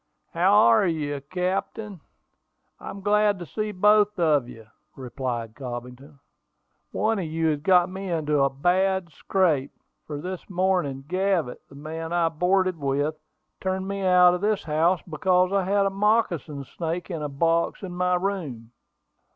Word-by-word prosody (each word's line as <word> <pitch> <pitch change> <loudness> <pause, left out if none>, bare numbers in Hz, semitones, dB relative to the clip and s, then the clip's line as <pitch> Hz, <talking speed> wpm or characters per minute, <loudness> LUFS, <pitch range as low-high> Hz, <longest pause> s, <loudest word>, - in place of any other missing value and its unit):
"How 180 +4 +3
are 115 - +5
you, 145 -4 -2
captain: 185 +1 -3 0.8
I'm 200 - -8
glad 210 0 +2
to 175 - -7
see 215 +5 -3
both 210 +2 +3
of 150 -7 +2
you," 115 -2 -12 0.3
replied 120 -3 -5
Cobbington. 125 +3 -8 0.7
"One 220 0 0
of 180 - -3
you 160 0 0
has 150 -2 0
got 180 +3 +4
me 190 +1 -6
into 150 -4 0
a 135 - +3
bad 180 +5 0
scrape, 155 -4 0 0.4
for 150 - -5
this 180 +6 -7
morning, 180 -8 0
Gavett, 185 -6 -1
the 140 - -15
man 160 +3 -6
I 170 -1 +2
boarded 180 +2 +1
with, 145 +2 0 0.5
turned 190 0 -2
me 200 0 -3
out 180 -1 +5
of 180 - -3
his 210 -1 0
house 165 +3 +1
because 180 +3 +1
I 195 -2 +1
had 200 +1 +2
a 195 - +1
moccasin 195 -8 0
snake 170 +6 -5
in 165 -3 -4
a 150 - -3
box 165 +7 0
in 185 - -5
my 180 0 +1
room." 165 - -4
175 Hz, 155 wpm, -25 LUFS, 145-190 Hz, 0.8 s, are